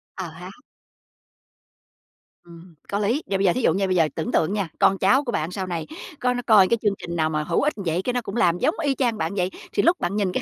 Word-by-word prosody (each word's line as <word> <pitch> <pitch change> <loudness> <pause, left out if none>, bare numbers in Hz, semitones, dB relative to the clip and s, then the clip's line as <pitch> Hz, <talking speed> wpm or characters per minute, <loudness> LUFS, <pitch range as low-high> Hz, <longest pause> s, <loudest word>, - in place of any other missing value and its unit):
Ờ 185 -3 -5
há. 170 +3 -10 1.9
Ừm, 170 0 -15
có 200 - -1
lý. 230 +9 0
Và 195 - 0
bây 195 - 0
giờ 175 - +4
thí 255 - -2
dụ - - +3
nha, 195 +1 0
bây 185 - 0
giờ 165 -3 +4
tưởng 160 - -3
tượng 165 +5 +1
nha, 200 -4 -1
con 195 - +4
cháu 265 +8 +3
của 245 - -3
bạn 160 -5 -2
sau 190 0 -4
này 170 -3 -4 0.3
có 250 0 +1
nó 245 - -3
coi 205 -4 +7
cái 235 - +2
chương 210 -2 +2
trình 170 - -6
nào 155 -2 +1
mà 155 -1 -1
hữu 170 +2 0
ích 300 +2 +1
vậy 180 -4 -2
cái 250 +6 -2
nó 245 - 0
cũng 210 -2 -7
làm 175 -7 +2
giống 310 - +1
y 280 -2 +1
chang 240 -4 0
bạn 165 -1 -2
vậy. 180 -2 0 0.2
Thì - - +1
lúc 345 +2 +3
bạn 175 +3 -2
nhìn 200 -3 0
cái 250 - -2
190 Hz, 270 wpm, -23 LUFS, 170-235 Hz, 1.9 s, coi